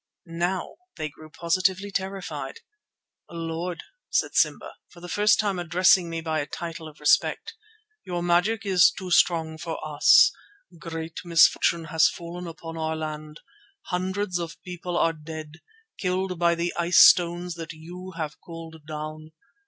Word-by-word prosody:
Now 175 +2 -3 0.2
they 155 -2 -3
grew 155 +2 -14
positively 185 +4 0
terrified. 195 - -4 0.7
"Lord," 165 +1 -4 0.3
said - - 0
Simba, - - +1 0.2
for 175 - -16
the 175 - -9
first 210 +4 +3
time 200 -4 0
addressing 175 +1 +3
me 165 0 -4
by 160 -1 -1
a 145 - -3
title 165 +1 -6
of 155 -1 -14
respect, 150 - +2 0.5
"your 175 -1 -3
magic 185 +5 +2
is 185 -3 +6
too 185 -1 -8
strong 165 -3 +2
for 165 -1 -4
us. 155 - +6 0.5
Great 165 -1 -6
misfortune 170 -1 +4
has 160 0 +5
fallen 175 +1 -7
upon 165 0 -8
our 160 0 -1
land. 155 0 -6 0.5
Hundreds 185 +1 -1
of 165 -1 -6
people 180 -1 -5
are 165 - +2
dead, 155 0 -9 0.4
killed 185 -1 -1
by 170 -1 +3
the 170 +1 -2
ice 170 +1 +2
stones 175 0 +6
that 165 0 -7
you 180 +4 -10
have 155 -3 -5
called 165 -2 -10
down. 155 0 -7
170 Hz, 145 wpm, -25 LUFS, 160-180 Hz, 0.7 s, is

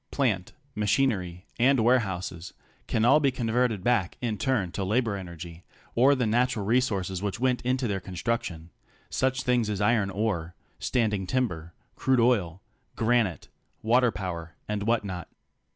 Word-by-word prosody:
Plant, 110 -10 0 0.2
machinery, 105 -5 0
and 130 +2 +4
warehouses 95 -7 0 0.3
can 115 0 +1
all 150 - +6
be 140 -2 +3
converted 120 -4 0
back 115 -7 +1
in 115 -4 -2
turn 115 -10 0
to 95 - -3
labor 110 +2 +1
energy 85 -2 -8 0.3
or 135 +4 +5
the 125 -2 0
natural 115 -1 +1
resources 100 -6 0
which 100 +2 -3
went 125 -1 +1
into 130 0 0
their 100 -2 -1
construction 90 -3 -3 0.2
— - - -33
such 130 0 +1
things 125 -4 +1
as 105 -2 -2
iron 105 -1 +2
ore, 95 -4 -2 0.2
standing 105 -6 0
timber, 90 -9 -2 0.2
crude 130 -1 +2
oil, 100 -7 +1 0.3
granite, 115 -5 +1 0.3
waterpower 100 -8 0
and 105 -1 -2
what 115 -2 +2
not. 90 -3 -6
110 Hz, 145 wpm, -27 LUFS, 95-125 Hz, 0.3 s, all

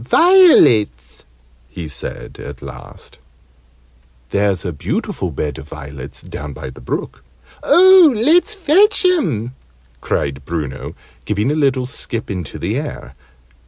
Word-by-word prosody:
"Violets," 115 - +4 0.4
he 85 -3 -7
said, 75 - -7
at 70 -2 -9
last. - - -12 1.1
"There's 100 -2 0
a 90 - -3
beautiful 70 - -3
bed 75 -4 -4
of 70 +3 -12
violets 70 -3 -9
down 75 -1 -7
by 65 - -8
the 65 - -14
brook 65 +2 -5 0.2
" - - -26
"Oh, 370 -3 +7
let's 335 - +2
fetch 390 +3 +3
'em!" 150 - 0 0.5
cried 70 0 -2
Bruno, 75 -4 -5 0.3
giving 105 +5 0
a - - 0
little 135 -4 +1
skip 115 -3 -5
into 90 -7 -6
the - - -2
air. 60 - -6
105 Hz, 125 wpm, -17 LUFS, -, 1.1 s, Oh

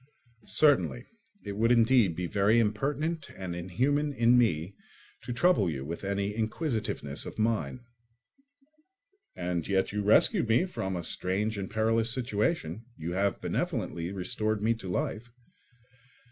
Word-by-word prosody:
"Certainly; 140 -4 +3 0.4
it 100 - -5
would 115 +2 +3
indeed 115 -6 +4
be 90 - -3
very 100 +5 +3
impertinent 140 +9 -1
and 95 -2 -5
inhuman 135 - 0
in 120 -1 +4
me 95 -7 +2 0.5
to - - -6
trouble 120 - +3
you 70 -4 -4
with 85 +5 -6
any 100 +1 -1
inquisitiveness 110 - -2
of - - -9
mine." 115 +3 -1 1.5
"And 90 -2 -2
yet 95 -1 +1
you 105 0 -2
rescued 105 +2 +4
me 120 +11 +4
from 95 - -4
a 85 - -4
strange 100 +6 0
and 95 - -4
perilous 115 +1 +1
situation; 115 +2 -1
you 80 +2 -4
have 100 +2 0
benevolently 85 +1 -2
restored 105 +2 -2
me 115 +2 +3
to 105 -5 -8
life." 110 +6 -3
110 Hz, 135 wpm, -29 LUFS, 95-120 Hz, 1.5 s, indeed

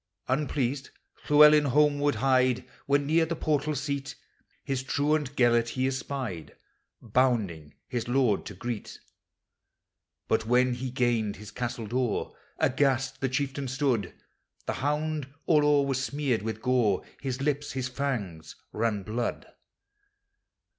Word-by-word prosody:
Unpleased, 135 -1 -1 0.4
Llewellyn 150 0 +7
homeward 145 +1 +3
hied, 130 -1 +2 0.2
When, 140 0 +2
near 160 +2 +3
the 170 - -2
portal 155 -1 0
seal. 140 0 -2 0.6
His 135 -2 -2
truant 145 +1 0
Gelert 120 -2 +3
he 130 +1 -1
espied. 130 - -4 0.5
Bounding 105 - 0
his 120 -2 -3
lord 120 -5 +2
to 105 - -8
greet 115 +2 -5 1.3
But, 115 - +1
when 125 +1 +3
he 130 +1 -4
gained 120 -4 0
his 105 +1 -10
castle 120 -2 -4
door. 120 +1 -1 0.2
Aghast 135 -1 +1
the 135 - +1
chieftain 135 +1 -2
stood; 130 -8 -1 0.5
The - - -1
hound 150 0 -2
all 150 -3 +4
o'er 145 -1 +4
was 135 -1 -1
smeared 140 -4 -1
with 110 +1 -4
gOfl 120 -6 +2 0.2
His 130 -2 -3
lips, 145 +1 -1
his 130 -1 -2
fangs, 125 - -4 0.2
ran 105 -2 0
blood. 115 +4 -3
130 Hz, 125 wpm, -28 LUFS, 120-145 Hz, 1.3 s, Llewellyn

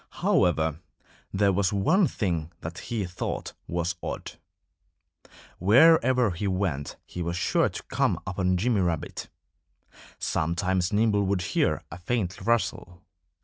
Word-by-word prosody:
However, 80 -3 +2 0.5
there 100 0 +2
was 95 0 +1
one 155 - +3
thing 85 - -2
that 85 +3 -6
he 110 -4 -1
thought 90 +1 -4
was 85 0 -1
odd. - - -5 1.3
Wherever 125 - +5
he 90 +4 -3
went 90 -7 -2
he 90 - -7
was 85 +1 -2
sure - - +2
to - - -7
come - - 0
upon 90 -1 0
Jimmy 110 +1 +1
Rabbit. 85 -4 -2 0.9
Sometimes 90 +3 0
Nimble 105 -2 +2
would 95 -2 0
hear - - 0
a 85 - -8
faint 95 -1 -2
rustle. 95 -6 -1
95 Hz, 125 wpm, -27 LUFS, 85-105 Hz, 1.3 s, Wherever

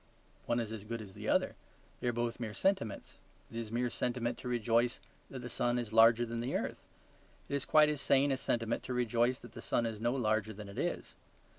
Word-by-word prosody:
One 120 - +2
is 115 -2 -3
as 110 -3 -6
good 115 +2 -4
as 100 -3 -9
the - - -5
other; - - +2 0.5
they - - -2
are - - +3
both 120 0 -2
mere 110 -3 -4
sentiments. 150 - -1 0.3
It 115 - -7
is 115 -2 -4
mere 120 +1 0
sentiment 120 0 -1
to 125 - -7
rejoice 120 0 +2 0.3
that 130 -2 -7
the - - -4
sun 120 0 0
is 115 -3 -3
larger 115 +1 +7
than 115 0 -4
the 120 +3 -2
earth; - - -3 0.6
it - - -6
is 140 +1 0
quite 155 -1 +6
as 150 -2 -1
sane 140 +1 +4
a 135 - +1
sentiment 115 -3 -1
to 125 - -3
rejoice 120 +1 +2
that - - -11
the - - -9
sun 120 - +1
is 110 -2 -4
no 120 +1 +2
larger 110 -3 +1
than 105 0 -9
it 100 - -7
is. - - -2
120 Hz, 230 wpm, -33 LUFS, 115-125 Hz, 0.6 s, larger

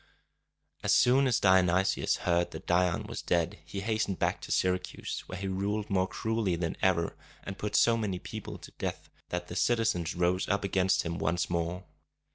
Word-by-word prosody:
As - - +1
soon 130 +2 +5
as 125 - +2
Dionysius 95 -1 +3
heard 85 0 +2
that - - -9
Dion 90 -1 +2
was - - -5
dead, 85 -1 0
he 95 +6 -6
hastened 110 -3 -1
back - - 0
to - - -7
Syracuse, 90 0 -1
where - - -6
he 95 +1 -4
ruled 100 +2 -2
more 95 -1 +2
cruelly 110 -4 -1
than 85 -1 -2
ever, 85 -3 +2 0.3
and 100 - -6
put 105 - -3
so 115 -1 +5
many 105 -5 -2
people - - -7
to - - -12
death - - -4 0.2
that 90 0 -3
the 90 - -7
citizens 95 -6 +1
rose 90 +1 +1
up 100 0 +1
against 95 -1 +2
him 85 +1 -3
once 85 +1 0
more. 85 +2 -2
95 Hz, 180 wpm, -30 LUFS, 85-100 Hz, 0.3 s, soon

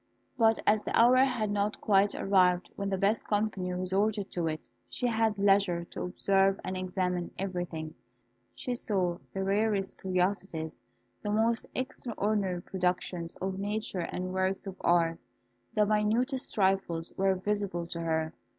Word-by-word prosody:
But 225 -3 +4
as 210 0 +3
the - - +1
hour 245 +2 +7
had 250 -5 +2
not 205 +1 0
quite 200 -1 +3
arrived 185 -2 +3
when 200 0 -2
the 195 - 0
best 200 +4 +1
company 205 -3 0
resorted 195 +3 0
to 170 -2 -1
it, 155 -1 -4 0.2
she - - -3
had 225 -3 +1
leisure 195 -3 +3
to - - -6
observe 195 +1 +2
and 185 - -3
examine 180 -1 -1
everything. 175 -5 -4 0.6
She 250 - -3
saw 185 -7 -1
the 195 - -2
rarest 200 0 0
curiosities, 185 -3 -1 0.4
the 210 - -3
most 225 +2 +1
extraordinary 210 -7 -2
productions 180 -2 -2
of 190 0 -3
nature 205 -1 -2
and 185 +1 -3
works 190 +1 0
of 195 -2 -6
art. 165 -1 +3 0.6
The 210 - +4
minutest 225 +6 +1
trifles 190 -4 0
were 195 0 +2
visible 195 -2 -1
to 170 0 -5
her. 160 -1 -1
195 Hz, 145 wpm, -30 LUFS, 180-210 Hz, 0.6 s, hour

